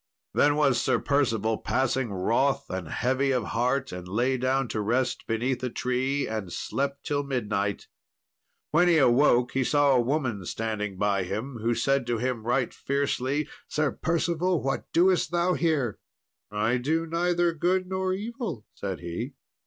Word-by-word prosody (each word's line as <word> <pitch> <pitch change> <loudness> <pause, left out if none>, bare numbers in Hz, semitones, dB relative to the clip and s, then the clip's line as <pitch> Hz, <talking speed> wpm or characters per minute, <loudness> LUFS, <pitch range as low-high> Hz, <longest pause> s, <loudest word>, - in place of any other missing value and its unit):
Then 145 0 +4
was 145 -4 +3
Sir - - +2
Percival 115 -6 +1
passing 130 -2 0
wroth 115 +8 +1
and 95 -3 -4
heavy 130 - 0
of 125 -4 +1
heart, 125 +5 0
and 90 0 -7
lay 120 +8 +1
down 130 +1 +1
to 110 - -2
rest 120 +4 0
beneath 120 +3 -1
a 125 - 0
tree, 130 +4 -1
and 110 -5 -4
slept 140 +7 -3
till 145 -2 0
midnight. 105 -7 -2 0.9
When 175 +3 +4
he 170 -2 +5
awoke 125 -2 +4
he 135 - +1
saw 145 +2 +3
a 125 - +4
woman 125 -6 -1
standing 105 -3 -3
by 100 0 +1
him, 115 +8 -4
who 115 +1 +1
said 135 -1 +1
to 120 -1 0
him 125 0 -2
right 125 0 +1
fiercely, 140 +1 -1 0.2
"Sir 150 -1 0
Percival, 170 +1 0
what 135 0 -2
doest 180 +1 +3
thou 175 +1 +1
here?" 150 - 0 0.5
"I 105 +4 +1
do 160 +6 0
neither 175 +1 +1
good 180 +3 +1
nor 190 0 -1
evil," 205 - -4
said 95 -3 -5
he. 90 - -5
130 Hz, 160 wpm, -27 LUFS, 115-150 Hz, 0.9 s, he